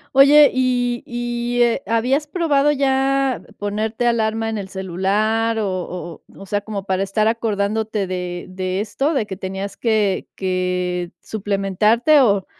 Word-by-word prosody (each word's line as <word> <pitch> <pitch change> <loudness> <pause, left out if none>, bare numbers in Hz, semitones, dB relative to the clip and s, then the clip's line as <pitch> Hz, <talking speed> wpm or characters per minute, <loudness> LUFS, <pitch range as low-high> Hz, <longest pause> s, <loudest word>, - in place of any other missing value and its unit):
Oye, 285 +2 +7
y 245 -2 0
y, 240 0 -2
eh, 240 +3 +2
¿habías 255 +6 +1
probado 295 -4 +2
ya 270 -1 +1 0.2
ponerte 215 +3 -2
alarma 225 -1 0
en 220 - -3
el 195 -2 -5
celular, 205 +5 0
o 205 -2 -1
o 180 -2 -6
o 195 - -11
sea, 205 +1 -1
como 205 -2 -6
para 190 -1 -1
estar 215 +3 +1
acordándote 215 -2 -1
de 180 -1 -4
de 185 +1 -2
esto, 275 +8 -1
de 235 -6 0
que 190 -2 -7
tenías 190 +1 -5
que 215 -4 0
que 180 -1 -2
suplementarte, 210 - +2
o 200 -7 +3
215 Hz, 145 wpm, -20 LUFS, 190-240 Hz, 0.2 s, Oye